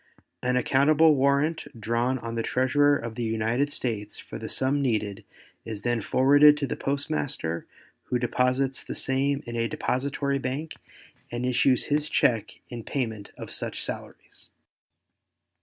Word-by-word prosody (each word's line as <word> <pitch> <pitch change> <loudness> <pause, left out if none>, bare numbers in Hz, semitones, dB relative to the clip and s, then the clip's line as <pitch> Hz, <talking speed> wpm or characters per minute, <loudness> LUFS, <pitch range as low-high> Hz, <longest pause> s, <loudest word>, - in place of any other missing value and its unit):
An 125 0 +1
accountable 150 +5 +4
warrant 140 +3 +1
drawn 120 +4 0
on 115 -2 -6
the 115 - -1
Treasurer 145 +4 +3
of 115 -1 -6
the 120 - -5
United 115 +5 0
States 110 -6 -3
for - - -8
the - - -6
sum 135 +2 +1
needed 110 -5 -1 0.4
is 110 -2 -7
then 120 -1 0
forwarded 145 +6 +6
to 145 - -1
the - - -3
postmaster 140 - -2 0.4
who 125 - 0
deposits 125 +2 0
the - - -6
same 140 +2 0
in 120 -1 -6
a 115 0 0
depository 140 +1 -1
bank 135 +5 -4 0.6
and 120 +1 -2
issues 125 0 +3
his 150 +1 0
check 115 -3 +1
in 120 -2 -7
payment 110 -7 -3
of - - -8
such - - -4
salaries. - - -9
130 Hz, 145 wpm, -26 LUFS, 115-140 Hz, 0.6 s, forwarded